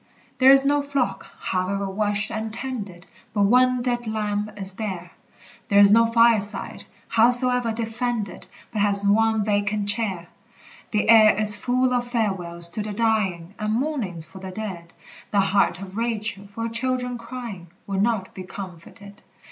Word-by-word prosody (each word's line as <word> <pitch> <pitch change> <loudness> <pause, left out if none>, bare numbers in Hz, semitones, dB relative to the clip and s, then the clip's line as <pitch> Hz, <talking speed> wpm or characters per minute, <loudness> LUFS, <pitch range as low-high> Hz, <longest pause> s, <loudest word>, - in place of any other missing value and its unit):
There 260 0 +6
is 270 0 +6
no 290 +1 +2
flock, 265 -9 -2
however 195 +2 -2
watched 205 +2 0
and 220 0 -4
tended, 210 -8 -7 0.3
But 205 - +2
one 250 +3 +3
dead 240 -2 -2
lamb 210 -1 -2
is 195 -1 +1
there! 185 -4 -6 0.6
There 200 - +2
is 200 0 +8
no 230 +2 +5
fireside, 230 -3 +1 0.2
howsoe'er 245 +1 +4
defended, 225 -1 -3 0.2
But 215 - -2
has 200 0 +3
one 220 0 +2
vacant 205 0 -1
chair! 205 -5 -1 0.6
The 210 -1 0
air 215 -3 +6
is 210 -1 +5
full 250 +4 0
of 245 -1 -1
farewells 190 -8 0
to 210 - -4
the 210 0 -4
dying, 200 -6 -1
And 215 0 -1
mournings 225 - -3
for 170 +4 -13
the 190 0 -8
dead; 185 -4 -7 0.4
The 205 - +1
heart 195 -3 +1
of 195 0 -9
Rachel, 215 -3 -1
for 205 +3 -7
her 230 - -2
children 250 +1 -1
crying, 230 -7 -8 0.2
Will 195 -1 -2
not 205 -3 -1
be 190 - -8
comforted! 190 +2 -11
215 Hz, 155 wpm, -23 LUFS, 195-235 Hz, 0.6 s, is